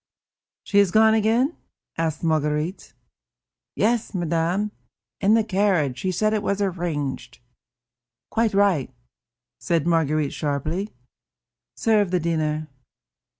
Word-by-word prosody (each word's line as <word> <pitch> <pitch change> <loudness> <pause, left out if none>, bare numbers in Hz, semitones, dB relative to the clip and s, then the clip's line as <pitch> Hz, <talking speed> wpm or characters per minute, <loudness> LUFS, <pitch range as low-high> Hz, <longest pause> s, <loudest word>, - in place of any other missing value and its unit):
"She 200 - +2
has 200 -2 +4
gone 220 +3 +5
again?" 225 +8 +2 0.4
asked 160 -1 -2
Marguerite. 155 +2 -1 0.8
"Yes, 230 -1 0
madame, 175 +4 0 0.5
in 210 +2 +4
the 225 - +3
carriage; 185 - +1
she 185 - -1
said 215 +4 +1
it 215 - 0
was 200 -1 -1
arranged." 150 -10 -3 0.9
"Quite 225 -2 +1
right," 195 -10 +2 0.7
said 165 -3 0
Marguerite 155 -3 +1
sharply. 155 +7 -3 0.8
"Serve 210 -4 +2
the 180 0 +1
dinner." 155 -2 -1
175 Hz, 110 wpm, -23 LUFS, 155-210 Hz, 0.9 s, gone